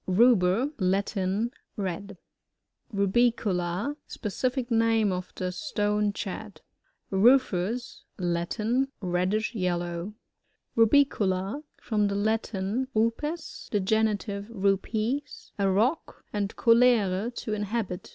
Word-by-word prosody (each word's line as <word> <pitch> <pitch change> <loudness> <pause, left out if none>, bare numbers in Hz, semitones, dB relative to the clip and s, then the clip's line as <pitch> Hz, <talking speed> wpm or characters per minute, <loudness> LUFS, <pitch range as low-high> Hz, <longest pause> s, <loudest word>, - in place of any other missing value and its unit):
Ruber. 215 +4 +4
— - - -39
Latin. 195 +3 0 0.3
Red. 195 0 -4 0.7
RasiooLA, 200 +1 +1
— - - -52
Specific 250 +3 -2
name 225 -2 +3
of 180 0 -4
the 185 0 -2
Stonechat. 210 -3 -2 0.5
RcTFos. 230 +1 +2
— - - -28
^Latin. 210 +9 0
Reddish 185 +5 0
yellow. 175 -1 -2 0.6
RuPiooLA. 225 -2 +2
— - - -45
From 210 -3 +1
the 200 - -2
Latin, 215 +2 -1
rupes^ 265 +9 -2
(in - - -3
the - - +4
genitive, 205 0 0
rujdi,) 215 +4 0 0.4
a 195 -1 +3
rock, 230 - 0
and 205 -1 -2
coUre, 230 -4 +4
to 215 - -4
inhabit. 205 -3 -3
210 Hz, 105 wpm, -27 LUFS, 190-230 Hz, 0.7 s, Ruber